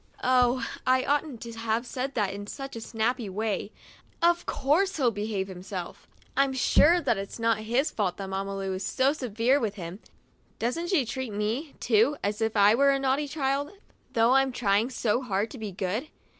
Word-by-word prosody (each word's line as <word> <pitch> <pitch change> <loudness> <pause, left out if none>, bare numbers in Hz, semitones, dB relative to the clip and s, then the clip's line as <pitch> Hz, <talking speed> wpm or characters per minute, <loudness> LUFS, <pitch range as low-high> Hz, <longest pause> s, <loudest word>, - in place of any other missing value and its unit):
Oh, 250 0 +3 0.2
I 255 0 +4
oughtn't 290 -4 -1
to 235 - -7
have 225 +1 -1
said 260 +2 -4
that 205 -4 0
in 205 0 -7
such 270 +3 -7
a 230 - -6
snappy 225 0 -1
way; 210 +1 -2 0.5
of 345 +1 +2
course 330 +8 +1
he 255 -5 +3
behaves 205 -2 -2
himself! 185 -1 -7 0.3
I'm 275 -1 +2
sure 310 +6 +5
that 235 - 0
it's 195 - -6
not 230 -1 +1
his 240 +7 0
fault 190 -5 -1
that 195 - -5
Mamma 195 +1 -3
Lu 195 -1 -2
is 185 +1 -4
so 265 +8 +2
severe 250 0 +1
with 215 -5 -2
him. 180 0 -7 0.6
Doesn't 290 +10 -2
she 335 -10 +2
treat 260 -1 -4
me, 225 +9 -2
too, 235 +6 +3
as 205 +2 -1
if 220 0 0
I 205 +1 +6
were 280 +4 +4
a 275 - +3
naughty 275 +2 0
child, 280 +2 -1 0.4
though 230 +1 +4
I'm 270 0 +4
trying 220 -1 +1
so 240 -2 0
hard 210 -3 -1
to 260 - -9
be 215 -2 -5
good? 195 - -2
235 Hz, 190 wpm, -27 LUFS, 205-270 Hz, 0.6 s, I